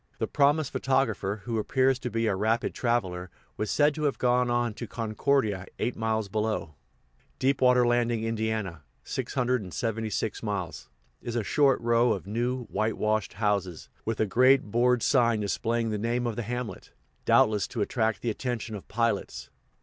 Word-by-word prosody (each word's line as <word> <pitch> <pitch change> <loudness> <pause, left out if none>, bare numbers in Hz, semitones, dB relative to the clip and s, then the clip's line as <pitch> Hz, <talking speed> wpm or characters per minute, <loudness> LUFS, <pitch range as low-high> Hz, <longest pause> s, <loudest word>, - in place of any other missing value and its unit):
The - - 0
promised 145 0 +2
photographer, 110 -6 0
who 115 -2 -1
appears 130 +4 +2
to 125 - -4
be 115 0 -1
a 105 -3 +1
rapid 110 +4 0
traveler, 95 -7 -1 0.3
was 105 - -3
said 150 0 +3
to 150 +1 -3
have 140 - 0
gone 125 0 +2
on 120 -1 +1
to 120 +2 -7
Concordia, 110 -3 0
eight 120 +2 -1
miles 110 -1 -1
below. 105 -5 -2 0.6
Deep 135 +1 +1
Water 125 -1 +5
Landing, 120 -1 +1
Ind. 115 -1 -2 0.6
(676 115 -3 -2
miles), 95 - -4 0.3
is 120 - -5
a 120 - 0
short 140 +5 +3
row 120 0 +3
of 95 - -6
new, 120 +5 -1
whitewashed 110 0 0
houses, 100 -5 -1
with 115 -1 -3
a 110 - +3
great 130 +2 +4
board 125 +1 +3
sign 115 -5 +3
displaying 115 +2 -1
the 105 - -2
name 120 +3 -1
of 115 -2 -2
the 120 - -2
hamlet, 120 +1 -5 0.3
doubtless 105 -2 +4
to 115 - -4
attract 110 -3 0
the 120 - +1
attention 120 -1 -4
of 105 - -8
pilots. 115 +2 -2
115 Hz, 160 wpm, -27 LUFS, 105-125 Hz, 0.6 s, Water